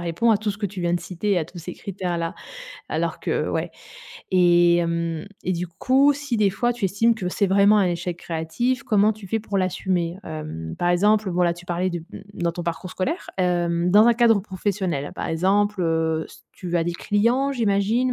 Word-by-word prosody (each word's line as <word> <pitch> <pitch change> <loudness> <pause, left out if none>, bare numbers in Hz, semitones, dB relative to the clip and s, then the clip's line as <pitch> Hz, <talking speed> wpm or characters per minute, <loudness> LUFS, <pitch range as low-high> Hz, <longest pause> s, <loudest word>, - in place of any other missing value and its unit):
répond 175 +7 +1
à 220 - +5
tout 215 0 -2
ce 200 - -7
que 210 - -1
tu 190 -1 -7
viens 175 0 0
de 175 - 0
citer, 185 +3 -1
à 165 - -1
tous 175 +3 -12
ces 175 +1 -7
critères 185 -3 -4
là. 165 +2 -3 0.6
Alors - - -2
que - - -3
heu, - - 0
ouais, - - -2 0.6
et 175 -1 +5
hem 170 0 -1 0.2
et 185 - -1
du 175 0 -2
coup, 260 - +3
si 280 -4 -3
des 205 -2 +3
fois 240 +5 0
tu 235 -4 -4
estimes 225 +5 +2
que 190 -5 -4
c'est 200 +2 0
vraiment 200 +2 +5
un 195 - +3
échec 175 0 -2
créatif, 175 +12 -2
comment 215 -2 +3
tu 210 -2 -12
fais 225 +4 -1
pour 205 -2 -2
l'assumer? 185 -2 -1
Hem, 155 - -6
par 175 - +1
exemple, 205 +3 +3
voilà, 175 -1 +2
tu 175 +1 -13
parlais 180 +1 -1
de, 175 - -3
mmh, - - -8
dans 170 -1 -1
ton 175 0 -5
parcours 170 +2 -4
scolaire, 275 - -3
hem, 175 -1 +1
dans 210 +4 +7
un 235 - +5
cadre 230 -2 +4
professionnel, 190 -6 -3
par - - -4
exemple, 195 +4 +1
heu, 160 -1 0
s - - -16
tu 175 -2 -6
as 165 - +1
des 175 - -1
clients, 235 +10 +1
j'imagine 230 +2 +1
185 Hz, 215 wpm, -23 LUFS, 170-210 Hz, 0.6 s, dans